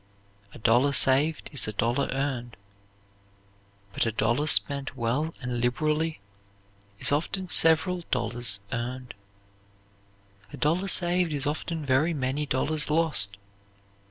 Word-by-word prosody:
"A - - -13
dollar 120 +5 +2
saved 140 +4 +4
is 140 - 0
a 110 - -4
dollar 120 +6 -1
earned," 130 -3 -4 1.4
but - - -1
a - - -1
dollar 120 +7 -1
spent 140 -3 +3
well 130 +8 -2
and 125 -1 -4
liberally 155 +6 -1 0.8
is - - +1
often 180 +5 -2
several 165 +3 +4
dollars 120 -4 -1
earned. 125 +1 -5 1.4
A - - -10
dollar 170 +6 -1
saved 175 -2 +4
is 145 -1 -2
often 155 +1 -4
very 145 +5 +1
many 140 +2 -3
dollars 150 +4 -1
lost. 150 -11 0
140 Hz, 120 wpm, -26 LUFS, 120-155 Hz, 1.4 s, saved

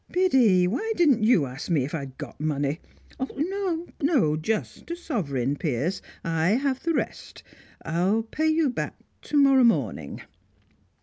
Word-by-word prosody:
Biddy, 255 - +4
why 420 - -1
didn't 295 - +4
you 215 - +4
ask 130 +6 -7
me 150 -7 +2
if 145 - -8
I'd 140 -4 -5
got - - -9
money? 145 0 -1 0.6
No, 350 +1 -2 0.2
no; 275 - +3
just 210 - -3
a 340 - -2
sovereign, 145 - -2
Piers; 150 +5 -2 0.2
I 165 +3 +1
have 265 0 -1
the 330 -1 0
rest. - - -4 0.4
I'll 185 +7 +1
pay 310 +8 -1
you 315 -3 +2
back - - -4 0.3
to 300 - -2
morrow 275 -2 +6
morning." 130 - 0
215 Hz, 145 wpm, -25 LUFS, -, 0.6 s, morrow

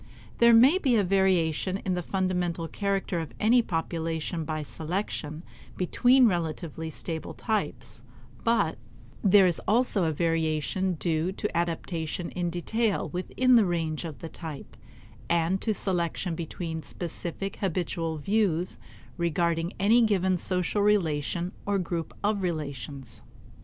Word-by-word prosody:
There 235 0 +7
may 260 +10 +7
be 260 -9 +2
a 210 - +4
variation 185 -2 +2
in 190 -2 -2
the 180 - -1
fundamental 180 -2 -1
character 195 -2 -1
of 160 -3 -6
any 240 +3 +5
population 165 -3 -2
by 155 -1 -3
selection 160 -1 -4 0.3
between 245 +7 +4
relatively 165 -3 -2
stable 160 0 -5
types; 220 -2 -3 0.4
but 225 - +1 0.4
there 195 -1 +7
is 175 -3 +1
also 215 -3 +3
a 160 - +1
variation 165 +3 0
due 165 +1 0
to 210 -1 -4
adaptation 170 0 -2
in 175 -1 -2
detail 210 +5 0
within 250 +8 +1
the 220 - +5
range 165 -2 -1
of 160 -4 -6
the 165 - -7
type, 160 -5 -8 0.5
and 170 +3 +1
to 220 - 0
selection 180 -3 -1
between 165 0 -4
specific 175 +4 -4
habitual 170 -3 -2
views 185 0 0 0.4
regarding 170 0 0
any 220 +5 +5
given 190 -4 +2
social 185 +3 0
relation 175 -4 +1
or 205 0 0
group 170 -3 -3
of 205 -1 +1
relations. 140 -6 -5
175 Hz, 130 wpm, -27 LUFS, 165-195 Hz, 0.5 s, There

